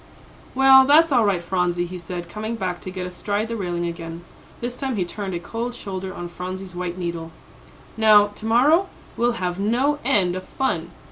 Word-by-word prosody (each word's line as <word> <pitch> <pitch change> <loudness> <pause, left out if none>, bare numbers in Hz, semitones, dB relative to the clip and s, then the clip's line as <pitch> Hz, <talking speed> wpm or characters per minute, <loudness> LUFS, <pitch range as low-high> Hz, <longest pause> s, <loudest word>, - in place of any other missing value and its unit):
"Well, 265 0 +8
that's 315 +2 +6
all 240 -5 +4
right, 190 -4 +1
Phronsie," 175 -1 0
he 180 +1 -7
said, 175 0 -6
coming 215 +5 -4
back 185 -5 -3
to - - -6
get 185 0 -5
astride 205 +4 -3
the 230 - -2
railing 175 -4 -2
again; 170 0 -6 0.4
this 240 +1 -4
time 265 -1 -3
he 185 -4 0
turned 195 +1 -5
a - - -2
cold 230 +7 -5
shoulder 190 -4 -5
on 175 -1 -6
Phronsie's 185 +2 -6
"white 175 0 -4
needle." 170 -2 -4 0.7
"Now, 215 -2 +7
to 215 - -10
morrow, 300 +11 +4 0.3
we'll 240 +1 +1
have 180 -5 -3
no 255 +8 +1
end 180 -3 +2
of 185 - -6
fun." 170 -11 -2
190 Hz, 190 wpm, -23 LUFS, 175-235 Hz, 0.7 s, Well